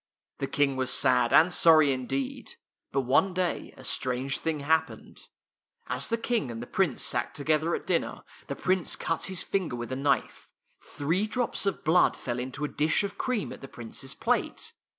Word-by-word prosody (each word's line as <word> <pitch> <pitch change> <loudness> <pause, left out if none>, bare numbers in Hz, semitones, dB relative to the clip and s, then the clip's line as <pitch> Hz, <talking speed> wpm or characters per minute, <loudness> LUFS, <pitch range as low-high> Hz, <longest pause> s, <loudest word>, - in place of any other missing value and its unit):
The - - -1
King 140 -2 +1
was 130 -1 -1
sad 125 -2 +3
and 165 +6 +6
sorry 155 -3 +6
indeed. 130 0 -3 0.4
But 135 - +1
one 145 +9 +2
day 180 -2 -1
a 130 - -12
strange 130 +1 -1
thing 160 -3 -2
happened. 160 +3 -1 0.6
As - - -1
the 230 - 0
King 230 - -1
and 115 -1 -6
the 120 - -5
Prince 170 -2 0
sat - - -1
together 155 +3 +1
at - - -6
dinner, - - -1 0.2
the - - -3
Prince 185 -2 0
cut 165 - -1
his 190 -2 -1
finger 185 -10 -1
with 120 +1 -6
a - - -1
knife. 140 0 -1 0.3
Three 170 +9 -1
drops 235 -3 -1
of 195 - -1
blood 170 +3 +4
fell 120 -1 -4
into 130 +4 -4
a - - -1
dish 155 +6 +1
of 200 0 -5
cream 250 -6 -1
at - - -12
the 135 - -8
Prince's 120 +2 -7
plate. - - -1
145 Hz, 185 wpm, -28 LUFS, 130-180 Hz, 0.6 s, and